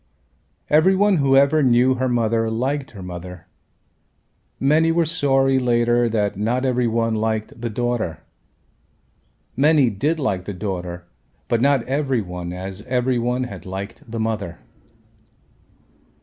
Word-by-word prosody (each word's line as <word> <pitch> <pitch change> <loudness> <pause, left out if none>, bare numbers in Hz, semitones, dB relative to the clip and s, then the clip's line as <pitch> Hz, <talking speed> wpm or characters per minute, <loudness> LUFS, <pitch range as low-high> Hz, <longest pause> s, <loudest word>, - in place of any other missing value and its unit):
Every 160 +6 +4
one 200 -1 +3
who 135 -2 +3
ever 140 +3 +4
knew 125 0 +4
her 130 0 -1
mother 115 -1 +1
liked 135 +5 -2
her 100 -4 -10
mother. 90 -1 -8 1.1
Many 155 +4 +3
were 170 0 +2
sorry 135 -4 +2
later 120 -1 +2
that 105 -2 0
not 120 +6 -1
every 125 -2 +1
one 115 0 0
liked 110 +1 -2
the 120 - -2
daughter. 115 -7 -2 1.3
Many 145 -3 +4
did 145 +11 -1
like 95 - -2
the 100 - -5
daughter 90 -3 -5 0.4
but 115 -1 +1
not 140 -2 +3
every 135 -2 0
one 90 -1 -6
as 95 +2 -6
every 125 0 +1
one 125 +2 -1
had 125 - -7
liked 95 +4 -6
the 115 0 -4
mother. 110 -6 -3
120 Hz, 135 wpm, -21 LUFS, 105-135 Hz, 1.3 s, Every